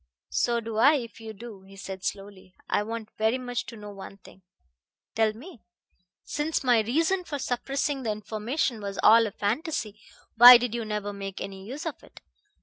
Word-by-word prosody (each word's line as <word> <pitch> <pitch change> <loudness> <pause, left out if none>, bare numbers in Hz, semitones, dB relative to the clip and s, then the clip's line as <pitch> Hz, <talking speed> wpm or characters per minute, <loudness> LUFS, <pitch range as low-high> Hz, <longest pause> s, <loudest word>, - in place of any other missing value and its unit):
"So 235 -1 +1
do 225 -1 -6
I, 280 +7 +6
if 235 -5 -5
you 220 0 -7
do," 215 -1 -11
he 195 +1 -16
said 195 -1 -8
slowly. 195 -2 -6
"I - - +1
want 220 0 -5
very 220 +3 +2
much 245 -1 -4
to 235 - -8
know 210 -1 -9
one 195 0 -10
thing." 190 0 -18 0.7
"Tell 220 -1 +2
me." 260 - -13 0.6
"Since 300 +1 -2
my 245 -3 +4
reason 320 - +1
for 300 -4 -5
suppressing 275 +2 -2
that 235 - -3
information 215 +4 -3
was 200 -1 -5
all 225 +1 +7
a - - -6
fantasy, 215 - -3 0.4
why 245 +2 +11
did 240 -1 -3
you 235 -1 -3
never 210 -1 -4
make 195 -1 -7
any 195 0 -8
use 280 +7 -7
of 325 - -5
it? - - -16
225 Hz, 185 wpm, -26 LUFS, 205-250 Hz, 0.7 s, why